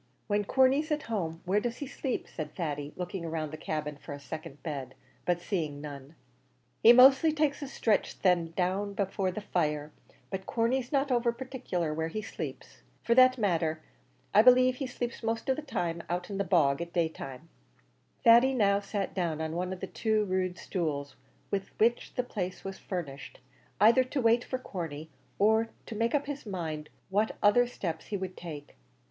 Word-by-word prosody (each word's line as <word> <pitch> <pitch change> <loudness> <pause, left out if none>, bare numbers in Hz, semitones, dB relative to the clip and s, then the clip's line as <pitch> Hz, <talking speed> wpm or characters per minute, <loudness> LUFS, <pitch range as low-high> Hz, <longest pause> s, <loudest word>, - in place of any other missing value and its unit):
"When 205 0 0
Corney's 265 - +3
at 300 -1 0
home, 170 -7 -3
where 195 +3 +2
does 235 +2 -3
he 285 - -4
sleep?" 265 -1 -3
said 155 - -6
Thady, 145 -4 -3
looking 180 -1 -4
round 155 -2 -3
the - - -2
cabin 150 -1 -4
for 145 - -8
a 145 - -7
second 145 -1 -8
bed, 135 -5 -5 0.3
but 175 -1 +1
seeing 165 -6 -2
none. 145 0 -9 0.7
"He 230 - +9
mostly 265 +5 +7
takes 300 -1 0
a 285 - -4
stretch 225 -5 0
then 175 -3 +3
down 195 +2 0
there 200 - +1
afore 190 0 -1
the 185 +4 -4
fire; 150 -6 -1 0.4
but 190 -1 -4
Corney's 245 +2 0
not 275 -1 +1
over 240 -1 +3
partickler 235 - -3
where 160 +1 -1
he 215 +6 -4
sleeps. - - -7 0.2
For 235 - +3
the 255 +1 +8
matter 170 -7 +1
of - - -14
that, 175 +5 -4
I - - +11
b'lieve 255 0 +3
he 270 - -3
sleeps 245 -1 -4
most 225 +3 -1
out 175 - -3
in 195 - -3
the - - +2
bog 165 -6 +3
at 170 0 -6
day 170 -2 +2
time." 150 0 -9 0.7
Thady 240 +2 +7
now 200 -4 +3
sat 200 -1 -3
down 170 -5 -1
on 160 0 -3
one 180 +1 -2
of 185 - -6
the - - -2
two 215 -2 0
rude 185 -1 -1
stools 150 -6 -3 0.4
with 195 -1 -1
which 235 +2 +2
the 250 - +1
place 185 -6 -4
was 195 0 -6
furnished, 150 -7 -6 0.4
either 230 +6 +6
to 260 +2 -3
wait 235 0 +4
for 255 - -3
Corney, 160 - -6 0.3
or 220 +2 +3 0.2
to - - -7
make 230 +4 +1
up 285 - +1
his 285 -1 -5
mind 160 -6 -4 0.2
what 210 +3 +1
other 240 +4 +5
steps 170 -9 -5
he 205 - -2
would 185 -1 -5
take. 150 -4 -8
195 Hz, 190 wpm, -30 LUFS, 160-235 Hz, 0.7 s, I